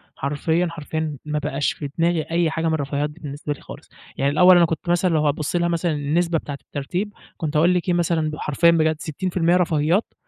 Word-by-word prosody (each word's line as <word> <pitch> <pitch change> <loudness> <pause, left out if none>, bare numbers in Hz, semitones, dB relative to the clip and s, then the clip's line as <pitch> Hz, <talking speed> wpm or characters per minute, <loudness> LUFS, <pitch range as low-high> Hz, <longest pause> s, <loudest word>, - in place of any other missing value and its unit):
حرفيًا، 160 +5 0
حرفيًا 155 -1 -4
ما 150 0 -1
بقاش 140 -1 -1
في 145 - -6
دماغي 170 0 +2
أي 170 -1 +2
حاجة 160 +1 -1
من 160 - +1
الرفاهيات 145 -1 -1
دي 150 +3 -15
بالنسبة 145 0 -5
لي 145 - -15
خالص. - - -12 0.3
يعني 140 +1 +1
الأول 180 +4 +7
أنا 170 - +6
كنت 165 +1 -4
مثلًا 175 +1 +2
لو 155 -1 +2
هتبُصّ 150 +3 -1
لها 170 0 +2
مثلًا 170 0 0
النسبة 160 +3 0
بتاعة 145 -2 -6
الترتيب، 180 +9 -4 0.2
كنت 155 -2 -3
هاقول 170 +4 +4
لِك 180 0 -1
إيه - - +3
مثلًا 170 -2 +1
ب - - -5
حرفيًا 155 +3 +3
بجد 160 -1 +2
60% 170 +2 0
رفاهيات، 170 +2 +1
160 Hz, 210 wpm, -22 LUFS, 150-175 Hz, 0.3 s, الأول